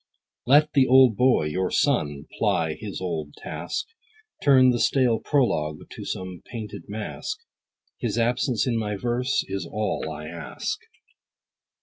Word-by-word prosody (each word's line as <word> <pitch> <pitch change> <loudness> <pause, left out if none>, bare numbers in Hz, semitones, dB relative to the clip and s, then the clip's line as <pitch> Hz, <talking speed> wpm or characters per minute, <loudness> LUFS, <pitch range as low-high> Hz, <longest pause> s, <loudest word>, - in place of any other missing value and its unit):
Let 150 +4 +5
the 135 -2 +5
old 130 -3 +6
boy, 125 -5 +4
your 90 +5 -1
son, 75 - +1
ply 80 -1 +1
his 105 +3 -6
old 80 -5 -4
task, 425 - -4 0.6
Turn 130 -3 +6
the 120 - 0
stale 125 -4 +3
prologue 75 - 0
to - - -8
some 95 -1 -5
painted 110 -3 -7
mask; 110 - -4 0.6
His 115 -3 -2
absence 120 0 +1
in 120 -3 0
my 105 -1 -2
verse, 125 +5 0
is 95 -2 -3
all 105 -6 -2
I 75 0 -7
ask. 80 -3 -4
110 Hz, 135 wpm, -25 LUFS, 90-130 Hz, 0.6 s, old